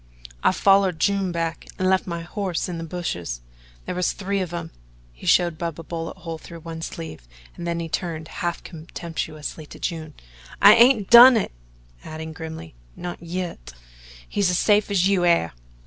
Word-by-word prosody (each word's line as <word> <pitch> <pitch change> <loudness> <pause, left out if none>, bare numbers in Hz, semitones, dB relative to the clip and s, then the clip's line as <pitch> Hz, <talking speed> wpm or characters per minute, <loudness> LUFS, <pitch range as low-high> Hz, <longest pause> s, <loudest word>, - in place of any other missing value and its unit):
"I - - +5
follered 195 -3 +3
June 195 0 +1
back 165 -1 -3
an' 185 - -1
left 190 0 +2
my 170 -1 -3
hoss 185 +1 -3
in 175 -2 -5
the - - -5
bushes. 120 - -4 0.4
There - - -3
was 180 0 0
three 200 0 -2
of 180 -2 -4
'em." 170 -1 -5 0.4
He - - -11
showed 170 -3 +3
Bub 170 -2 -4
a - - -7
bullet 165 +2 -5
hole 165 -3 -6
through 170 +1 -11
one 165 0 -7
sleeve 160 - -7 0.3
and 175 - -6
then 170 0 -1
he 165 - -3
turned 160 -1 -3
half 175 -1 -2
contemptuously 160 -2 -6
to - - -11
June: 160 -3 -4 0.4
"I 205 - +9
hain't 230 -3 +5
done 240 +1 +10
it" 215 - -1 0.5
adding 160 0 -7
grimly 160 - -8 0.2
"not 175 -2 -6
yit. 170 - -5 0.5
He's 200 -3 +1
as 180 - +1
safe 210 +1 +3
as 190 -2 +3
you 195 -3 +2
air. 170 - +3
170 Hz, 180 wpm, -23 LUFS, 160-185 Hz, 0.5 s, done